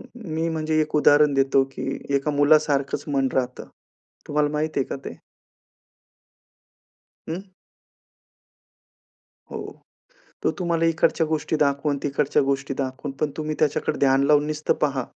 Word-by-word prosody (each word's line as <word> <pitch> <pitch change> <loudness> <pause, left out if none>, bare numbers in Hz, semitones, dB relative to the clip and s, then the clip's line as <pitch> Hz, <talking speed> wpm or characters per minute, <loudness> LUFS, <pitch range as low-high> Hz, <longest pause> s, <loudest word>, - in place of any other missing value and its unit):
मी 165 -8 -3
म्हणजे 155 -1 -2
एक 155 0 -2
उदाहरण 150 0 +5
देतो 135 0 +3
की - - -4 0.2
एका 140 +2 0
मुलासारखंच 145 -1 +2
मन 135 -1 +2
राहतं. 125 -1 -2 0.6
तुम्हाला 150 0 +1
माहित 150 +1 -1
आहे 135 - +3
का - - -5
ते? - - -7 2.1
अं? 165 - -3 2.1
हो. - - -5 0.8
तो - - +3
तुम्हाला 170 -2 0
इकडच्या 165 0 +2
गोष्टी 155 0 -1
दाखवणं, 140 0 +1
तिकडच्या 145 0 +1
गोष्टी 135 0 -1
दाखवणं 135 +1 -4
पण 150 - +1
तुम्ही 155 0 -3
त्याच्याकडे 150 -2 0
ध्यान 135 0 +3
लावून 150 0 +4
नुसतं 155 0 0
पहा. 140 -4 +1
145 Hz, 125 wpm, -23 LUFS, 140-155 Hz, 2.1 s, उदाहरण